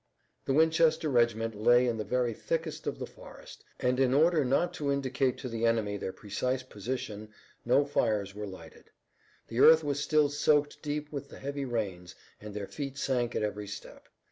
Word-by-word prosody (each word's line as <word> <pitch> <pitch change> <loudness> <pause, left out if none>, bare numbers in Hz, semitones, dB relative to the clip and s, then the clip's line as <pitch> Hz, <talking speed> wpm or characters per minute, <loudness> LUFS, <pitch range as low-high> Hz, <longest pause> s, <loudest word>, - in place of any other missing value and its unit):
The 135 - 0
Winchester 160 +1 +3
regiment 115 -3 +2
lay 120 +4 +4
in 120 -2 0
the 110 - -2
very 120 +2 0
thickest 160 +6 -3
of - - -2
the - - -4
forest - - -13 0.2
and 125 +1 +1
in 130 -1 +3
order 160 +1 +4
not 155 +7 +1
to 145 -5 -2
indicate 135 -2 0
to 130 - -6
the 115 -1 -4
enemy 110 -3 +1
their 95 -1 -4
precise 125 +7 -3
position 110 -2 -5 0.4
no 135 +4 +4
fires 105 -8 0
were 105 0 -6
lighted. 85 -5 -12 0.6
The 115 - -3
earth 160 +3 +8
was 145 -1 -1
still 150 0 +3
soaked 145 0 +1
deep 150 0 -4
with 140 -1 -6
the - - -11
heavy 140 0 -4
rains 100 -8 -4 0.2
and 105 -1 -9
their 105 -1 -3
feet 140 +4 -6
sank 125 -4 -1
at - - 0
every 105 -1 -3
step. 100 - -10
125 Hz, 185 wpm, -30 LUFS, 110-145 Hz, 0.6 s, earth